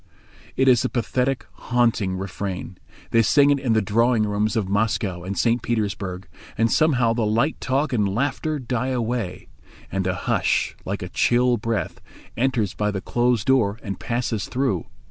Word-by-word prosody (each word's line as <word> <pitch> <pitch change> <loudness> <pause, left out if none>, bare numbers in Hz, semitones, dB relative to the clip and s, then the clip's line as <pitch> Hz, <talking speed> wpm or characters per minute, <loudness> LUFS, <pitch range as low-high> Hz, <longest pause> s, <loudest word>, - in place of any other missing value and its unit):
It 135 - +2
is 125 -3 +5
a 130 - 0
pathetic, 125 +2 -1
haunting 115 -6 0
refrain. 95 -1 -5 0.3
They 115 - +5
sing 140 +6 +4
it 140 - +2
in 125 -4 +1
the 110 -2 +2
drawing 115 +3 +2
rooms 105 +2 0
of 110 -4 0
Moscow 100 -3 0
and 95 +1 -4
St. 120 +3 +2
Petersburg, 95 -5 -3 0.3
and 115 0 +2
somehow 125 -7 +3
the 115 -1 -1
light 115 +8 +1
talk 135 +2 0
and 105 -4 +2
laughter 140 +8 -1
die 125 -2 -2
away, 120 -6 -2 0.4
and 95 0 -1
a 90 - 0
hush, - - 0
like - - -3
a - - -6
chill 125 0 +2
breath, 115 -7 -3 0.3
enters 120 -6 0
by 105 0 -1
the 100 -2 -2
closed 120 +1 0
door 115 -6 +2
and 100 -3 -5
passes 115 -3 -2
through. 125 - -1
115 Hz, 165 wpm, -23 LUFS, 100-125 Hz, 0.4 s, is